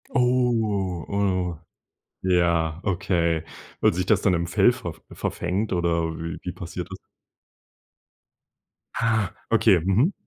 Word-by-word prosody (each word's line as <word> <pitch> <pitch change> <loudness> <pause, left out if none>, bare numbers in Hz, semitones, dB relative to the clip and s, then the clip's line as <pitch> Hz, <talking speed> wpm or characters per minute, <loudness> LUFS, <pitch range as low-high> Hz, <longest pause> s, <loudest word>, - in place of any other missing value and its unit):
Oh. 115 -8 +1
Oh, 95 -4 0 0.7
ja, 85 -3 +2
okay. 85 -4 0 0.4
Weil 110 - +4
sich 90 +1 -1
das 100 -1 +3
dann 95 - +3
im 85 0 0
Fell 95 +7 +4
verf 120 -10 -7
verfängt 100 +4 -2
oder 85 -2 +1
wie 85 +1 -5
wie 90 - -4
passiert 90 -1 -6
das? - - -7 2.0
Ah. 110 -4 +1 0.2
Okay. 90 - +5
Mhm. 95 - +2
95 Hz, 115 wpm, -24 LUFS, 85-105 Hz, 2.0 s, Okay